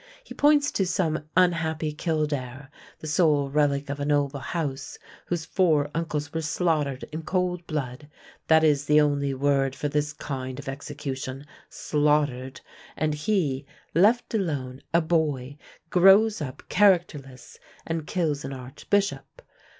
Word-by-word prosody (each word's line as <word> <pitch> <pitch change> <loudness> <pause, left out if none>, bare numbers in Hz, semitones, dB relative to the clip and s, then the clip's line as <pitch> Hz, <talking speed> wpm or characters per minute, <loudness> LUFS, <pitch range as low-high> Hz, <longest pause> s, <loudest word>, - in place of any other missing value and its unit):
He - - -10
points 290 -1 +3
to 195 - 0
some 155 -5 -1
unhappy 160 -4 +1
Kildare, 145 -4 -3 0.3
the - - -8
sole 150 -3 +2
relic 145 -1 +1
of 140 +1 -4
a - - -2
noble 145 -1 +1
house, 135 0 -4 0.3
whose 170 -2 -2
four 155 -6 +2
uncles 150 -3 -3
were 160 - -1
slaughtered 150 -4 0
in 155 +1 -4
cold 180 0 -2
blood 145 -1 -4 0.4
that 160 0 +5
is 145 -2 +3
the 150 +1 +5
only 140 -2 +1
word 135 -1 +1
for 145 +2 -2
this 150 0 0
kind 130 -4 -5
of 140 - -9
execution, 135 -1 -6 0.2
slaughtered 145 -3 0 0.4
and 155 -1 0
he, 150 -5 -1 0.3
left 215 +9 +3
alone, 140 - -2
a 170 - +4
boy, 150 -5 0 0.4
grows 195 +3 +5
up 130 -3 -6
characterless 170 -10 +1 0.3
and 165 -2 -3
kills 155 -5 -1
an 135 - -5
archbishop. 195 - -3
150 Hz, 135 wpm, -26 LUFS, 140-165 Hz, 0.4 s, that